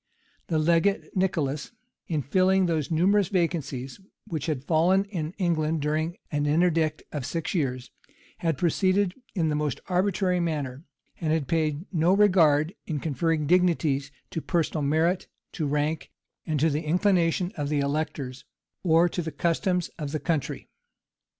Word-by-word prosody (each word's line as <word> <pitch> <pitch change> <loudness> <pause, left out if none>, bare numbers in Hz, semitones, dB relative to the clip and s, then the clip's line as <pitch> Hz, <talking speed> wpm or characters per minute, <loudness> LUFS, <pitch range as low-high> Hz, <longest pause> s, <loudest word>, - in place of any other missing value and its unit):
The 160 - 0
legate, 170 +5 +1
Nicholas, 160 - -1 0.3
in 155 -4 -1
filling 185 +5 +3
those 160 -4 -1
numerous 190 +4 +3
vacancies 160 -7 -2 0.3
which 155 -3 -4
had 145 -5 -2
fallen 175 +5 +3
in 170 -5 -4
England 160 -5 0
during 155 +3 -1
an 145 -1 0
interdict 160 -1 +2
of 145 -4 -4
six 155 +4 -3
years, 130 -7 -2 0.5
had 165 -4 0
proceeded 185 +3 +2 0.2
in 165 -4 +1
the 150 - 0
most 150 -3 -1
arbitrary 185 0 +1
manner; 150 -4 -3 0.3
and 160 -2 -1
had 155 -4 0
paid 160 -1 0
no 170 +2 +3
regard, 170 -6 +4
in 155 -4 -2
conferring 160 +2 0
dignities, 160 -5 +2 0.2
to 165 - -3
personal 165 -2 0
merit, 160 +6 +1 0.2
to 155 - -2
rank, 150 +2 -1 0.5
to 155 +3 +2
the 150 +2 -1
inclination 175 +1 +2
of 145 -2 -3
the 150 -1 +1
electors, 140 -3 -3 0.4
or 165 -1 +4
to 175 - -3
the 160 -1 -4
customs 175 +3 0
of 145 -1 -4
the 155 - -1
country. 160 -5 -2
160 Hz, 145 wpm, -26 LUFS, 150-180 Hz, 0.5 s, regard